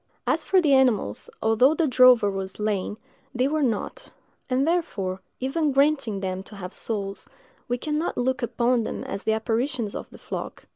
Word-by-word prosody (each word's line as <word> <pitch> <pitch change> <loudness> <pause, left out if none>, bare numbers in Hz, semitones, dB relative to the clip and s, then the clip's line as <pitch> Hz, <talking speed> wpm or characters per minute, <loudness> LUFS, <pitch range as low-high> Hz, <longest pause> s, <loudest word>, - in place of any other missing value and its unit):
As - - +1
for 380 - +3
the 305 -6 +3
animals, 240 - +2
although 225 +7 +4
the 325 -1 +2
drover 250 -5 +6
was 195 -1 -4
slain, 210 -1 -2 0.4
they 250 +2 +2
were 310 +2 0
not; 230 -7 -2 0.4
and 265 +3 +1
therefore, 200 - -1 0.2
even 290 +4 0
granting 275 -7 +2
them 185 -1 -3
to 210 - -12
have 185 -1 -7
souls, 200 -3 -4 0.4
we 245 - 0
can 300 +4 -2
not 335 - -2
look 260 +1 0
upon 240 0 +1
them - - -4
as 200 - -5
the 220 - +3
apparitions 230 0 -1
of - - -6
the - - -13
flock. - - -7
245 Hz, 180 wpm, -25 LUFS, 205-275 Hz, 0.4 s, drover